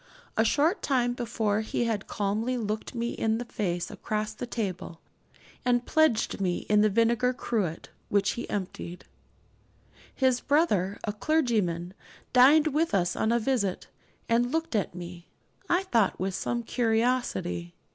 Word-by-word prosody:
A 220 - +4
short 305 - +2
time 245 -3 +1
before 220 -3 -1
he 220 - -1
had 220 -4 -2
calmly 215 +5 -1
looked 215 +2 -4
me 235 0 -1
in 220 0 0
the 240 - -4
face 175 -7 -3
across 215 0 -3
the 245 +3 -6
table, 190 -7 -4 0.6
and 245 -1 +2
pledged 285 -10 +2
me 180 -2 -1
in 210 0 +4
the 215 - +4
vinegar 235 +4 +2
cruet, 205 - -2 0.2
which 200 -1 +2
he 240 - -6
emptied. 180 -2 -5 1.1
His 260 -2 +2
brother, 210 - +2
a 210 - -2
clergyman, 210 - 0 0.4
dined 280 +5 +7
with 315 -5 +1
us 175 -1 +1
on 220 - +1
a 235 - +3
visit, 225 -6 -1 0.4
and 240 +1 +2
looked 325 -3 -1
at 200 -4 -1
me, 175 -1 -8 0.4
I 355 +2 +3
thought, 230 - +1
with 190 +1 -1
some 235 +5 -2
curiosity. 225 - 0
225 Hz, 145 wpm, -28 LUFS, 195-250 Hz, 1.1 s, dined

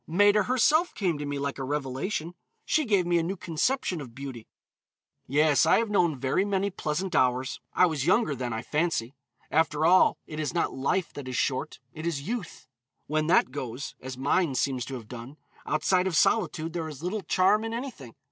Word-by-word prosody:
Maida 205 +5 +4
herself 295 +7 +3
came 175 -7 0
to 145 - -4
me 145 0 -3
like 140 0 -3
a - - -3
revelation. 145 +5 -3 0.3
She 310 -1 +2
gave 200 -6 +2
me 175 0 +2
a - - 0
new 185 +4 -2
conception 175 - -1
of 120 -4 -10
beauty. 130 -5 -8 0.8
Yes, 150 +1 +4
I - - +6
have 225 -2 0
known 170 -7 +2
very 135 +8 +1
many 200 0 0
pleasant 175 +2 -3
hours. 130 0 +1 0.2
I 180 - +6
was 155 -6 -1
younger 185 -4 +3
then, 125 -1 -3
I 110 +1 -3
fancy. 150 -6 -1 0.4
After 155 -1 +2
all, 180 +3 +5
it 155 - -7
is 155 +2 -2
not 170 - 0
life 150 +7 -1
that 145 -3 -7
is 130 - -4
short, 130 -2 -1 0.2
it 155 +2 -5
is 145 -3 -3
youth. 230 -5 -5 0.4
When 155 +1 0
that 175 - +4
goes, 125 +2 -5
as 130 0 -7
mine 140 +2 +1
seems 130 -3 0
to 135 - -6
have 115 -4 -9
done, 125 +4 -9 0.3
outside 180 +4 +2
of 180 - -1
solitude 165 -3 +2
there 165 -2 -3
is 150 0 -10
little 195 +4 -2
charm 195 +4 +3
in 225 - -3
anything. 230 - -6
155 Hz, 195 wpm, -27 LUFS, 135-185 Hz, 0.8 s, I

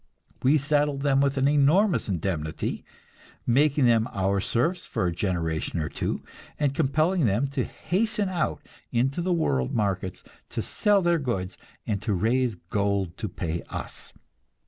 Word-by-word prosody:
We 140 +4 +5
saddled 145 -1 +1
them 135 -1 +3
with 140 0 +1
an 135 +1 +3
enormous 150 - +3
indemnity, 85 -4 -2 0.6
making 140 +2 +3
them 115 0 +3
our 100 0 +1
serfs 160 - 0
for - - -1
a 90 - +1
generation 85 -3 -1
or 75 - -2
two, - - -3 0.4
and 145 -3 +1
compelling 155 +3 +2
them 105 +7 +2
to 135 -2 -1
hasten 210 +2 -1
out 170 - -1 0.3
into 135 +7 +1
the 180 +1 0
world 70 - +1
markets, 95 -4 -1 0.3
to - - -3
sell 205 -2 +2
their 170 -1 +3
goods 105 -10 -2 0.3
and 100 -2 -2 0.2
raise 120 +2 +1
gold 95 0 -1
to 110 - -3
pay 85 -1 -3
us. - - -6
125 Hz, 145 wpm, -26 LUFS, 95-150 Hz, 0.6 s, We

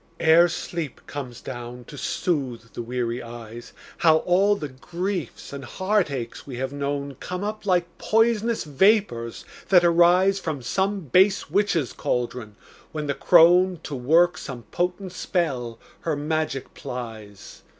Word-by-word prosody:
Ere 165 +2 +6
sleep 165 -4 -5
comes 130 -4 -7
down 120 -1 -7
to 145 - -12
soothe 130 -7 -2
the - - -5
weary 120 0 -3
eyes, 115 0 -9 0.3
How 160 -2 +5
all 195 +3 +4
the 155 -7 -5
griefs 170 - -5
and 140 -1 -6
heartaches 170 - -2
we 130 - -6
have 130 +2 -3
known 140 0 -3
Come 180 +2 -5
up 215 0 -4
like 180 -2 +3
pois'nous 225 0 +2
vapors 150 - +1 0.2
that 180 -2 +6
arise 175 +3 +4
From 150 -8 -4
some 195 - 0
base 185 - +3
witch's 185 - +1
caldron, 120 -3 -3 0.4
when 155 -1 -4
the 140 - 0
crone, 175 +3 +5
To 150 - -6
work 160 +7 +3
some 125 -3 -7
potent 180 +1 -2
spell, 135 -11 -2 0.2
her 160 -2 -2
magic 150 -2 -2
plies. 110 -5 -8
155 Hz, 140 wpm, -24 LUFS, 125-180 Hz, 0.4 s, Ere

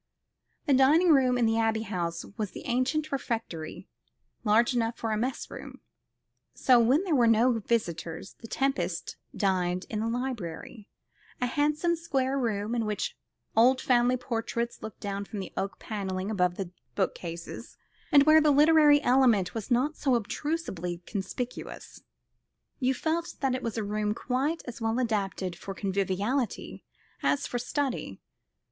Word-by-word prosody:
The 290 - +3
dining 295 +7 +5
room 260 -5 +5
at 240 - +3
the 225 0 +2
Abbey 225 -1 +1
House 170 -5 -3
was 210 -3 -2
the - - -10
ancient 275 +6 0
refectory, 225 - -4 0.6
large 230 +3 +4
enough 230 -1 0
for 225 - -2
a - - +1
mess 245 +5 -3
room; - - -9 0.8
so, 250 -2 +5
when 255 +9 +4
there 365 -5 -1
were 245 -5 +4
no 230 +1 +4
visitors, 170 -6 -2
the 230 - -9
Tempests 270 -10 -1 0.2
dined 180 -2 0
in 215 - -2
the 225 - -1
library 230 -4 -4 0.5
a 250 - +1
handsome 300 +6 +1
square 275 -5 -1
room, 220 -2 -1
in 230 -2 0
which 210 -1 -2 0.4
old 255 +3 +5
family 250 0 +3
portraits 235 -1 -3
looked 220 - -8
down 200 0 -3
from 205 - -8
the 195 - -6
oak 190 0 -3
panelling 195 -2 -4
above 180 -4 +1
the 185 -2 -5 0.2
bookcases, 170 -3 -4 0.3
and 280 -1 +8
where 310 +1 +7
the 305 - +4
literary 295 0 +6
element 240 -9 +4
was 225 0 -5
not 260 +5 +2
obtrusively 220 - -1
conspicuous. 220 +5 -6 0.8
You 260 0 +1
felt 330 +4 -2
that 270 -2 +1
it 255 - -2
was 230 -2 -3
a 220 - -1
room 210 +1 -1
quite 270 +7 -1
as 240 -1 -8
well 225 +1 0
adapted 200 -6 -1
for 195 - -7
conviviality 200 +6 -2 0.4
as 285 - +1
for 245 - -3
study. 265 +1 -2
230 Hz, 150 wpm, -28 LUFS, 200-265 Hz, 0.8 s, and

